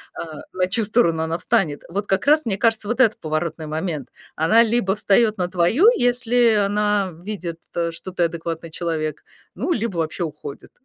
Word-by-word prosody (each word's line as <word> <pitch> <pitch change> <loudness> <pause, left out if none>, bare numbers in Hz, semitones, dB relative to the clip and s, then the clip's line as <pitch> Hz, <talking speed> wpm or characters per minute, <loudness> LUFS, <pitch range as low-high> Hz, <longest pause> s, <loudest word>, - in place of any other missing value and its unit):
а, 155 -3 -7
на 185 0 0
чью 215 +4 0
сторону 170 -7 +2
она 160 +1 -2
встанет, 160 -4 0
вот 200 +4 -3
как 195 +7 0
раз, 305 +2 +5
мне 200 -4 -1
кажется, 220 -1 +1
вот 240 +3 -2
это 225 -4 +4
поворотный 155 0 -3
момент, 155 -2 -4 0.3
она 215 +9 +5
либо 220 -4 +1
встаёт 215 +1 +3
на 180 - 0
твою, 185 - +3
если 245 - +3
она 205 -1 +1
видит, 180 -5 -5 0.3
что 170 +3 -8
ты 180 -1 0
адекватный 165 0 -4
человек, 155 -3 -3 0.3
ну, 265 - -2
либо 225 - -2
вообще 165 +2 -2
уходит. 150 -3 -8
190 Hz, 170 wpm, -21 LUFS, 165-220 Hz, 0.3 s, раз